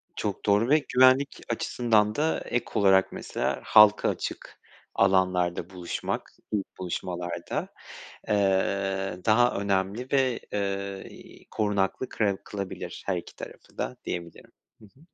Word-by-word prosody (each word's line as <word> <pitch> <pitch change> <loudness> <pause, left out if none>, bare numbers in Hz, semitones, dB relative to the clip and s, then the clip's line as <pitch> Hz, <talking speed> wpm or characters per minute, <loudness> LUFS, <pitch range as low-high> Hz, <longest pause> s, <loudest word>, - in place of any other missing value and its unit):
Çok 105 -2 -3
doğru 105 +4 +3
ve 155 - +6
güvenlik 130 +2 +5
açısından 110 -2 +1
da 155 +4 +1
ek 120 - -1
olarak 95 -1 +4
mesela - - -3
halka 105 -1 +6
açık - - -5 0.4
alanlarda 90 -2 +2
buluşmak, 90 -2 -4 0.2
ilk 105 -3 -3
buluşmalarda, 90 -1 -4 0.6
eee, 95 -2 0
daha 120 +3 +4
önemli 100 +5 -1
ve, 130 -3 +2
eee, 100 -1 -3
i - - -15
korunaklı 105 +3 0
kırev 100 -3 0
kılabilir 100 -2 -6
her - - 0
iki - - -8
tarafı - - -11
da - - -3
diyebilirim. 85 -1 -6 0.3
Hı 110 - -16
hı. 105 +7 -20
100 Hz, 125 wpm, -27 LUFS, 95-110 Hz, 0.6 s, ve